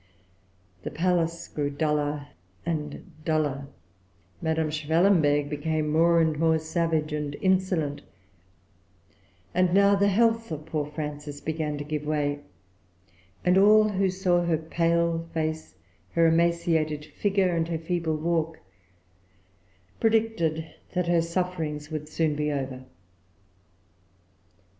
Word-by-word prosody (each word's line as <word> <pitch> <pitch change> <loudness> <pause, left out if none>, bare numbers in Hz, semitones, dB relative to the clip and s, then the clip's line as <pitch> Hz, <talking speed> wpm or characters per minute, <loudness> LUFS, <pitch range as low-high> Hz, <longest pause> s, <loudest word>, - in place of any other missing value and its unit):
The - - -4
palace 170 -1 0
grew 145 -1 -2
duller 145 -1 -1 0.4
and 150 -3 -4
duller; 150 -4 0 0.7
Madame 160 -1 0
Schwellenberg 155 -1 +3
became 155 +1 -1
more 170 +2 +4
and 160 -2 +1
more 160 0 +3
savage 160 -1 -1
and 150 -1 -3
insolent; 185 -6 +1 1.5
and 180 0 +2
now 200 0 +6
the 200 0 +3
health 225 +1 +2
of 155 -1 -5
poor 150 -2 -2
Frances 150 -1 -6
began 155 -1 -3
to 145 - -4
give 150 0 -3
way; 145 -1 -1 1.1
and 180 +1 +5
all 215 +2 +6
who 195 -1 +1
saw 180 -2 +1
her 170 -2 +1
pale 165 +1 0
face, 160 0 -3 0.4
her 165 0 +4
emaciated 165 -2 +2
figure, 195 -2 0
and 165 -1 0
her 165 -1 -2
feeble 165 -1 -1
walk, 165 0 -1 1.4
predicted 220 -8 +1 0.3
that 180 -1 0
her 170 -1 +3
sufferings 165 -3 -3
would 150 -1 -5
soon 155 -1 0
be 150 0 -1
over. 130 -2 -4
160 Hz, 115 wpm, -26 LUFS, 150-175 Hz, 1.5 s, now